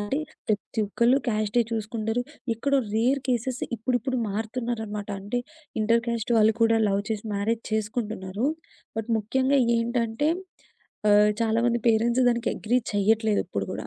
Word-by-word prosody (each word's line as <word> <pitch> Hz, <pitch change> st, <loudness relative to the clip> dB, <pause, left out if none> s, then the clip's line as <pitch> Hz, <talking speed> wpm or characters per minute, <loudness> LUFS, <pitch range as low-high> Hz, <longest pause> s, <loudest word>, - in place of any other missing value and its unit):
అంటే 205 Hz, +7 st, -1 dB, 0.3 s
ప్రతి 215 Hz, +1 st, -1 dB
ఒక్కళ్ళు, 235 Hz, +5 st, +3 dB
క్యాస్డే 215 Hz, +1 st, +1 dB
చూసుకుంటరు, 225 Hz, +1 st, -2 dB, 0.3 s
ఎక్కడో 280 Hz, +5 st, +1 dB, 0.2 s
రేర్ 255 Hz, +5 st, +2 dB
కేసెస్ 250 Hz, +1 st, -1 dB
ఇప్పుడిప్పుడు 255 Hz, +3 st, -1 dB
మారుతున్నారనమాట. 220 Hz, -1 st, -3 dB
అంటే 205 Hz, +5 st, -2 dB, 0.4 s
ఇంటర్‌‌క్యాస్ట్ 230 Hz, +1 st, +1 dB
వాళ్ళు 220 Hz, 0 st, +5 dB
కూడా 225 Hz, 0 st, +4 dB
లవ్ 200 Hz, 0 st, +1 dB
చేసి 215 Hz, 0 st, -2 dB
మ్యారేజ్ 220 Hz, +3 st, -1 dB
చేసుకుంటున్నారు. 215 Hz, -1 st, -2 dB, 0.5 s
బట్ 225 Hz, +1 st, -3 dB
ముఖ్యంగా 265 Hz, +6 st, +1 dB, 0.2 s
ఏంటంటే, 230 Hz, +3 st, 0 dB, 0.8 s
ఆహ్, 210 Hz, 0 st, +6 dB
చాలామంది 230 Hz, +1 st, +2 dB
పేరెంట్స్ 235 Hz, +3 st, +3 dB
దానికి 235 Hz, -1 st, +1 dB
అగ్రీ 240 Hz, +3 st, +1 dB
చెయ్యట్లేదు 215 Hz, +1 st, +2 dB
ఇప్పుడు -, -, -3 dB
గూడా. -, -, -5 dB
225 Hz, 125 wpm, -26 LUFS, 215-240 Hz, 0.8 s, ఆహ్